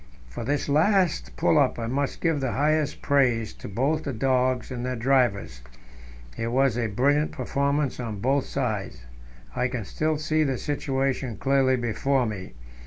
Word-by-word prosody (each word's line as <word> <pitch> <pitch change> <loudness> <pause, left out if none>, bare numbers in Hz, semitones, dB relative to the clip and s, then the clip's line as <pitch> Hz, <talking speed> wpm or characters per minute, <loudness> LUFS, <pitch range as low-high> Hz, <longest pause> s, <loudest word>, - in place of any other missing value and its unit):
For - - -6
this 145 +4 -1
last 155 - +2
pull - - +3
up - - +2
I 115 - -3
must 135 +4 -2
give 165 -3 +1
the 130 -3 -2
highest 150 +1 0
praise 125 -6 +2
both 135 +10 -1
to 145 - -4
the 120 - -7
dogs 130 0 +1
and 125 -1 -4
their 125 0 -2
drivers; 115 - +1 0.7
it 115 - -3
was 130 0 +2
a 120 -2 0
brilliant 140 +8 +1
performance 140 0 -1
on 110 -4 -4
both 135 +5 +1
sides. 105 - -3 0.5
I 125 - +1
can 125 -4 -4
still 155 +6 -1
see 155 +1 +1
the 135 -3 -1
situation 135 -4 -2
clearly 135 0 +2
before 125 +2 0
me. 100 -4 -6
130 Hz, 165 wpm, -25 LUFS, 115-140 Hz, 0.7 s, pull